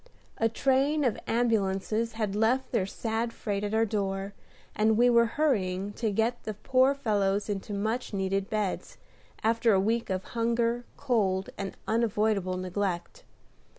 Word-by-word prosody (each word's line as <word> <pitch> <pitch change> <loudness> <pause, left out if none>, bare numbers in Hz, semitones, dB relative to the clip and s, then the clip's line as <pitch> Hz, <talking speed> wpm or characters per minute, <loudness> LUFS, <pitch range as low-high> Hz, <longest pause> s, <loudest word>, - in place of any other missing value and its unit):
A 225 - +3
train 275 +5 +2
of 245 -5 +1
ambulances 225 -1 0
had 215 -3 -2
left 230 +5 +1
their 190 - +1
sad 225 +3 -2
freight 205 -3 -3
at 205 +1 -1
our 225 +1 +3
door, 195 -2 -2 0.4
and 215 +1 +3
we 245 +1 +5
were 235 -1 +5
hurrying 200 -9 +1
to 225 0 -1
get 225 +4 0
the 215 - -5
poor 260 +5 +3
fellows 205 -6 0
into 205 -1 -4
much 220 +5 -2
needed 195 0 -1
beds, 210 -3 -2 0.5
after 225 0 +3
a 190 - +4
week 225 +4 0
of 190 0 -1
hunger, 235 +1 0
cold, 195 -8 0
and 195 -1 -5
unavoidable 215 -4 +1
neglect. 185 - -3
220 Hz, 150 wpm, -28 LUFS, 195-235 Hz, 0.5 s, we